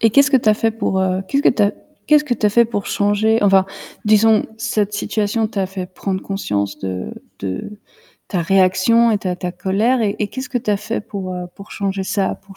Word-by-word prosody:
Et 225 - +4
qu'est-ce 280 +5 +4
que 275 - +6
tu 230 -4 +1
as 215 - +6
fait 225 +1 +1
pour 205 -3 -1
heu, 185 0 0
qu'est-ce 280 +1 +1
que - - +5
tu 220 - +2
as 205 - +3 0.3
qu'est-ce 300 0 +5
que 260 - -2
tu 225 -3 +1
as - - +5
fait 235 +3 +4
pour 210 -3 -4
changer 205 +2 +1
enfin, 195 -1 +4 0.4
disons 215 +1 +4
cette 210 -2 -1
situation 215 +1 -1
t'a 200 -3 -2
fait 185 -1 -5
prendre 190 +1 -4
conscience 100 - -3
de 95 -1 -4 0.3
de 100 - -5 0.5
ta 180 -4 -1
réaction 190 +6 +3
et 215 - +2
ta 185 -2 -3
ta 180 -1 -4
colère 200 +7 +1
et 205 -2 0
et 210 - -1
qu'est-ce 265 +2 -6
que 265 - -3
tu 225 -3 -3
as 205 - +3
fait 220 +2 -3
pour, 190 -3 -6
heu, 180 0 -5
pour 200 - -12
changer 195 -1 -2
ça, 195 0 -1
pour 195 0 -17
205 Hz, 230 wpm, -19 LUFS, 190-225 Hz, 0.5 s, que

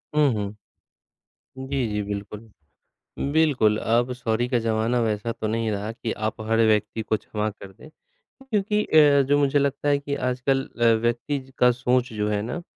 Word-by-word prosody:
हुँ, 150 -2 +4
हुँ। 105 -1 -6 0.9
जी, 135 -3 -1
जी, 105 -1 -2
बिल्कुल। 100 0 -6 0.9
बिल्कुल 140 -10 +3
अब 120 +2 +1
सॉरी 120 -1 -1
का 125 - +2
ज़माना 115 +2 0
वैसा 110 0 -1
तो 110 - -4
नहीं 115 +1 -1
रहा 105 +1 -3
कि 115 0 -5
आप 110 0 -3
हर 115 - +2
व्यक्ति 105 +1 +1
को 110 0 0
क्षमा 105 +1 -3
कर 100 -2 -12
दें 150 +11 -15 0.6
क्योंकि 210 -1 +1
अ, 145 -2 +5
जो 145 +1 +3
मुझे 145 0 +2
लगता 140 +1 0
है 145 -1 +3
कि 140 0 -4
आजकल 130 +1 0 0.2
अ, - - +4 0.2
व्यक्ति 120 +5 -1 0.2
का 125 0 +5
सोच 125 +1 0
जो 105 -1 -1
है 105 -1 0
ना 120 +11 -4
120 Hz, 175 wpm, -24 LUFS, 110-140 Hz, 0.9 s, अ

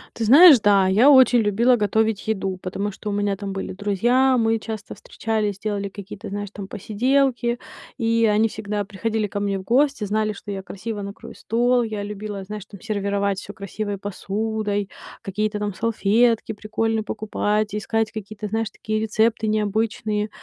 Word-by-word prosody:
Ты 225 - -2
знаешь, 285 +3 +9
да, 200 -2 +4
я 220 +9 +5
очень 260 -3 +7
любила 225 +4 +3
готовить 220 0 0
еду, 195 -3 -1
потому 200 +3 -3
что 210 +2 -7
у - - -1
меня 205 -1 0
там 200 0 -6
были 195 -1 -4
друзья, 240 +7 +2
мы 225 -1 +2
часто 220 -1 -6
встречались, 215 -3 -3
делали 200 -1 -3
какие-то, 200 +1 -9
знаешь, 205 0 -4
там, 200 -2 -7
посиделки. 240 +3 0 0.4
И 230 -2 +2
они 215 +2 +3
всегда 210 -2 -4
приходили 215 +2 -2
ко 205 0 -4
мне 200 -1 -1
в 190 - -7
гости, 270 +3 +2
знали, 215 +1 0
что 205 0 -8
я 195 - -4
красиво 205 +2 -6
накрою 200 +3 -8
стол. 245 +2 +1
Я 215 -3 -3
любила, 205 -1 -6
знаешь, 210 +1 -7
там, 200 - -12
сервировать 200 -2 -1
всё 205 - -9
красивой 205 0 -5
посудой, 205 +1 -3 0.4
какие-то 210 +2 -2
там 205 -1 -3
салфетки 230 +2 +2
прикольные 220 +1 -1
покупать, 210 -1 -1
искать 215 +1 -1
какие-то, 215 -1 -6
знаешь, 225 +1 -1
такие 215 +1 -3
рецепты 220 +1 +1
необычные, 215 0 -1
210 Hz, 165 wpm, -22 LUFS, 200-225 Hz, 0.4 s, знаешь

